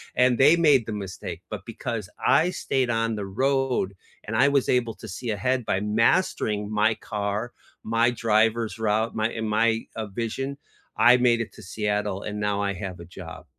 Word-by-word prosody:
and 125 -1 +4
they 150 +5 +6
made 145 -8 +4
the 110 - -5
mistake, 100 -3 -6
but - - -6
because 110 -6 -5 0.2
I 170 +3 +4
stayed 130 -8 -1
on 115 -1 0
the 100 - -4
road, 130 -2 0 0.3
and 110 +1 -4
I 130 +5 +5
was 140 -2 +2
able 120 -3 +1
to 110 - -11
see 115 +5 -6
ahead 125 +5 0
by 95 - 0
mastering 105 - +1
my 110 +1 +2
car, 105 +3 -3 0.3
my 115 +2 +2
driver's 115 0 +1
route, 110 +1 0
my 110 +1 +1
and 110 -1 -4
my, 115 +1 +2
uh, 110 -1 -4
vision, 120 +7 -4 0.4
I 120 +1 +7
made 120 -1 +3
it 115 - -4
to - - -13
Seattle, 105 0 -2
and 105 0 -5
now 105 -1 0
I 100 -1 0
have 95 -1 -6
a 85 - -9
job. 90 -1 -10
110 Hz, 185 wpm, -25 LUFS, 105-120 Hz, 0.4 s, I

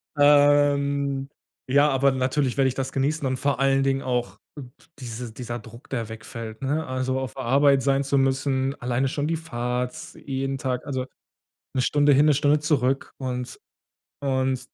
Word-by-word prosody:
Ähm, 145 -1 +3 0.4
ja, 140 +3 +5
aber 135 0 +3
natürlich 130 0 0
werde 135 -1 +4
ich 125 - -5
das 135 -1 -3
genießen 140 +2 0
und 130 0 -1
vor 140 0 0
allen 135 0 +3
Dingen 135 0 +1
auch 125 -2 -2 0.6
diese 120 -2 -6
dieser 120 +1 -6
Druck, 115 +2 -14
der 115 -4 -3
wegfällt, 110 +1 -8
ne? 150 +4 -1
Also, 130 0 -1
auf 130 -4 -5
Arbeit 135 +2 +3
sein 140 +1 +2
zu 140 +1 0
müssen, 135 0 +1
alleine 125 +2 0
schon 145 +2 -2
die 165 - 0
Fahrt, 125 -5 -3 0.2
jeden 135 0 -3
Tag, 130 -2 -3
also, 130 -3 -3 0.7
1 130 - +1
Stunde 145 +2 +3
hin, 140 +2 +5
1 150 - +5
Stunde 145 +2 +3
zurück 135 -3 0
und 125 -2 -5 0.6
und 130 -2 0
135 Hz, 165 wpm, -24 LUFS, 125-140 Hz, 0.7 s, ja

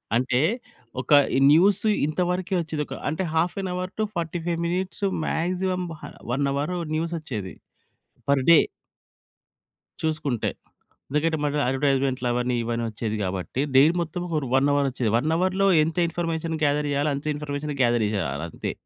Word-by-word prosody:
అంటే, 125 +1 +2 0.6
ఒక 125 - -10 0.2
ఈ - - +3
న్యూసు 195 +6 +4 0.2
ఇంత 155 +4 -1
వరకే 185 +1 -2
వచ్చేది 155 -2 -3
ఒక, - - -7 0.2
అంటే 160 +5 -2
half 165 +2 +1
an 190 - -3
hour 185 +1 -3
to - - +3
45 170 0 -2
minutes, 185 +2 -3 0.2
maximum 180 +2 -1 0.2
హా - - -7 0.2
1 140 +2 +1
అవరు 150 +6 -1 0.2
న్యూసొచ్చేది 155 - -3 0.8
పర్ 135 -2 +3
డే. 165 - +9 1.4
చూసుకుంటే. 155 -7 -1 0.6
ఎందుకంటే, 160 +3 +1
మగ 145 0 0
అడ్వర్టైజ్మెంట్‌లు 135 -2 +1
అవన్నీ 125 0 0
ఇవన్నీ 115 0 -2
వచ్చేది 110 0 -3
కాబట్టి. 95 +7 -3
డైలీ 150 +6 +7
మొత్తం 170 +1 -4
పోని 175 - -6
ఫర్ 150 -3 0
1 135 +2 +4
అవర్‌ 145 -1 +2
వచ్చేది. 125 -3 -1
1 155 +6 0
అవర్‌లో 185 +2 +1 0.2
ఎంత 160 +3 -3
ఇన్ఫర్మేషన్ 165 -1 -2
గ్యాదర్ 145 0 +2
చెయ్యాలో, 145 +1 +1
అంతే 140 +2 -6
ఇన్ఫర్మేషన్ 145 0 -4
గ్యాదర్ 120 -2 +3
చేయాలంతే. 80 -3 -3
150 Hz, 150 wpm, -25 LUFS, 130-170 Hz, 1.4 s, డే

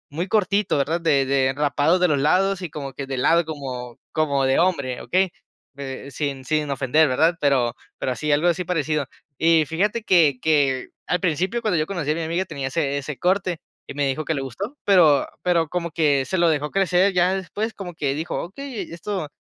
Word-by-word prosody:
muy 175 +4 -2
cortito, 200 -3 +1
¿verdad?, 155 +5 0
de 140 -5 +2
de 135 -1 +2
rapado 145 +4 +2
de 180 0 +3
los 145 -2 +2
lados 190 +6 +2
y 175 - -4
como 140 -2 -6
que 135 0 -6
de 135 - -3
lado 165 +6 +3
como 130 -6 -6
como 140 -3 +1
de 135 +3 +2
hombre, 140 -9 0
¿okey?, 185 0 +1 0.5
eh, 135 0 -6
sin 140 -2 -3
sin 155 0 -1
ofender, 140 +3 +2
¿verdad?, 160 +7 +2
pero 130 -4 +2 0.2
pero 130 - -2
así 150 +4 -3
algo 150 +4 +3
así 175 +1 -1
parecido. 155 -5 -1 0.3
Y 160 -1 +4
fíjate 205 +9 -1
que 160 -10 +4
que 140 -4 +1 0.2
al 180 - 0
principio, 185 +7 0
cuando 210 -7 +1
yo 155 - -1
conocí 170 -7 -2
a - - 0
mi 165 - -3
amiga 170 +4 -1
tenía 140 -5 -5
ese 140 -1 -1
ese 140 0 -5
corte, 180 -3 0 0.3
y - - -7
me 145 0 0
dijo 150 +3 -2
que 160 - 0
le 135 - -2
gustó, 200 - -6
pero 165 -8 +5 0.2
pero 170 -3 +2
como 170 -1 -3
que 145 -4 +2
se 190 - -2
lo 170 -1 +4
dejó 150 -1 -1
crecer, 190 0 +2
ya 180 +1 +3
después 205 +3 -4
como 180 -3 -7
que 140 -3 -1
dijo: 160 +3 -3
"Okey 235 +5 -7
esto 170 -2 -4
160 Hz, 205 wpm, -23 LUFS, 140-180 Hz, 0.5 s, pero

